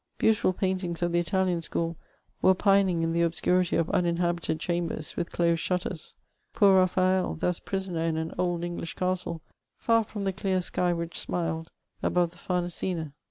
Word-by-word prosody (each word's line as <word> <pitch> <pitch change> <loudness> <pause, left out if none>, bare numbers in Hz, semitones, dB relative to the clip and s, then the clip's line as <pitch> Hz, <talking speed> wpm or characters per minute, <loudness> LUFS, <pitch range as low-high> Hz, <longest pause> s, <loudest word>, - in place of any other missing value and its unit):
Beautiful 220 -3 +3
paintings 185 -2 -1
of 175 - +1
tiie 175 - +2
Italian 180 +1 +1
schocd 165 +1 -2 0.5
wetepinmg 190 -2 +4
in 165 0 0
the 170 0 +2
ob 165 -1 +1
scurity 180 0 +2
of 165 - +1
uninhabited 170 -2 0
chambers, 170 -2 -2
with 170 -1 -2
dosed 170 -1 +1
shntten; 180 -2 -3 0.4
poor 200 -3 +5
Baphad, 185 -1 +1
thus 180 +1 0
prisoner 190 -4 -3
in 165 -1 0
an 160 0 -2
okL 175 -1 -1
English 170 -1 -5
caetle, 180 -3 -2 0.5
&r 230 -1 +5
finnt 210 -1 -6
tiie 195 -1 -1
dear 190 -2 +1
sky 180 0 0
which 170 -1 -3
smiled 165 -2 -2 0.3
aboye 175 -2 +2
the 175 - -19
Famesina 175 -3 -2
175 Hz, 160 wpm, -28 LUFS, 170-185 Hz, 0.5 s, poor